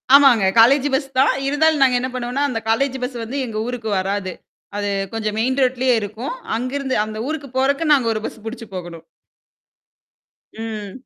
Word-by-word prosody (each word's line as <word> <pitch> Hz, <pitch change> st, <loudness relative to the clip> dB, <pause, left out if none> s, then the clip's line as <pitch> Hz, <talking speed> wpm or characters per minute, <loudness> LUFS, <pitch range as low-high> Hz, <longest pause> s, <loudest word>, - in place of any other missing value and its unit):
ஆமாங்க. 255 Hz, -8 st, +6 dB
College 270 Hz, +5 st, +6 dB
bus 270 Hz, 0 st, +1 dB
தான். 265 Hz, -, +5 dB
இருந்தாலும் 300 Hz, +1 st, +2 dB
நாங்க 255 Hz, -2 st, +4 dB
என்ன 255 Hz, +1 st, -3 dB
பண்ணுவோன்னா, 250 Hz, +3 st, -2 dB
அந்த 225 Hz, -2 st, -2 dB
காலேஜ் 265 Hz, +3 st, +1 dB
பஸ் 250 Hz, -1 st, -4 dB
வந்து 255 Hz, +5 st, -5 dB
எங்க 220 Hz, -2 st, -5 dB
ஊருக்கு 240 Hz, -3 st, -4 dB
வராது. 190 Hz, -1 st, -2 dB, 0.4 s
அது 205 Hz, 0 st, -1 dB, 0.2 s
கொஞ்சம் 215 Hz, -1 st, -2 dB
மெயின் 260 Hz, +4 st, 0 dB
ரோட்லயே 255 Hz, -1 st, +2 dB
இருக்கும். 220 Hz, -, -5 dB, 0.2 s
அங்கருந்து 260 Hz, +2 st, -2 dB
அந்த 215 Hz, 0 st, -7 dB
ஊருக்கு 295 Hz, -3 st, -4 dB
போறக்கு 275 Hz, +4 st, +2 dB
நாங்க 255 Hz, -5 st, +2 dB
ஒரு 215 Hz, -, -3 dB
பஸ் 220 Hz, -, -7 dB
புடிச்சு 230 Hz, +1 st, -6 dB
போகணும். 170 Hz, -2 st, -8 dB, 1.6 s
ம். 210 Hz, -3 st, -5 dB
250 Hz, 165 wpm, -20 LUFS, 220-275 Hz, 1.6 s, ஆமாங்க